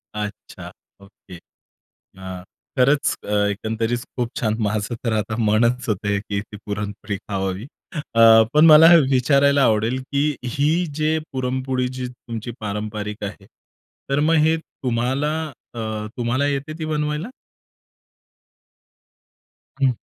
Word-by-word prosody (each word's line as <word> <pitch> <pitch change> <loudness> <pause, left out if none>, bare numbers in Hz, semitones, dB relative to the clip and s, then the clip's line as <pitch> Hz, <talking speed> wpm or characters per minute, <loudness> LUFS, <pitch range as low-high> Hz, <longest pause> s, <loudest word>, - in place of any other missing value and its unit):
अच्छा! 105 -2 -7 0.3
ओके. 100 -2 -15
अ, 95 +1 -14 0.3
खरंच 140 +3 +3
अ, - - -8 0.2
एकंदरीत 110 +3 -2 0.2
खूप 120 -1 -1
छान! 110 -2 0
माझं 105 +2 -1
तर 115 -3 0
आता 110 +1 -2
मनच 115 +3 +2
होत, 105 -3 0
की 100 0 -1
ती 105 0 -11
पुरणपोळी 105 0 -4
खावावी. 95 +2 -4 0.3
अ, 115 -6 +6
पण 150 +2 +6
मला 160 0 +9
हे 170 - +9
विचारायला 140 +2 +4
आवडेल, 115 +2 +2
की 140 +2 -1
ही 150 +8 +1
जे 155 +1 +2 0.2
पुरणपोळी 130 0 -1
जी 130 0 -5
तुमची 120 -1 -7
पारंपरिक 105 0 -4
आहे, 100 0 -8 0.6
तर 140 +1 +1
मग 160 +2 +3
हे 160 +1 +2
तुम्हाला 130 0 -2 0.4
अ, - - -5 0.4
तुम्हाला 125 +4 0
येते 145 +2 -2
ती 160 - -3
बनवायला? 150 +2 -2 2.5
हं. 135 - +4
120 Hz, 125 wpm, -22 LUFS, 105-140 Hz, 2.5 s, मला